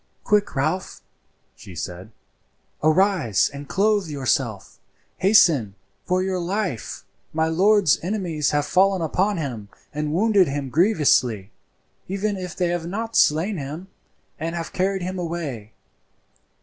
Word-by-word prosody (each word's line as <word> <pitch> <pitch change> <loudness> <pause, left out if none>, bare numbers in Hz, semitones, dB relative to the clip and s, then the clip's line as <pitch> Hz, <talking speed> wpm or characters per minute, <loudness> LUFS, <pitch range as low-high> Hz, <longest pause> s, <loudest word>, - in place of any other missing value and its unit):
"Quick, 210 -4 +1
Ralph!" 155 +7 -2 0.5
she 90 - -12
said, 90 +5 -7 0.7
"arise 155 - +2
and 140 0 -9
clothe 205 -1 +2
yourself. 130 -7 -2 0.4
Hasten 160 - +4 0.3
for 185 +1 +1
your 190 -1 -1
life. 180 - -3 0.3
My 160 +1 +1
lord's 190 0 +4
enemies 170 -6 -1
have 145 0 0
fallen 190 +3 +2
upon 190 +5 0
him 120 -10 -5 0.2
and 150 0 -2
wounded 200 +1 +3
him 140 -1 -3
grievously, 135 - +2 0.6
even 200 +2 -2
if 185 -3 -6
they 180 -2 0
have 175 -1 -2
not 225 +5 -4
slain 170 +7 +3
him, 155 +6 -7 0.5
and 165 +2 -3
have 165 -1 -5
carried 190 0 0
him 185 +1 -4
away. 155 -11 -5
170 Hz, 125 wpm, -23 LUFS, 145-190 Hz, 0.7 s, Hasten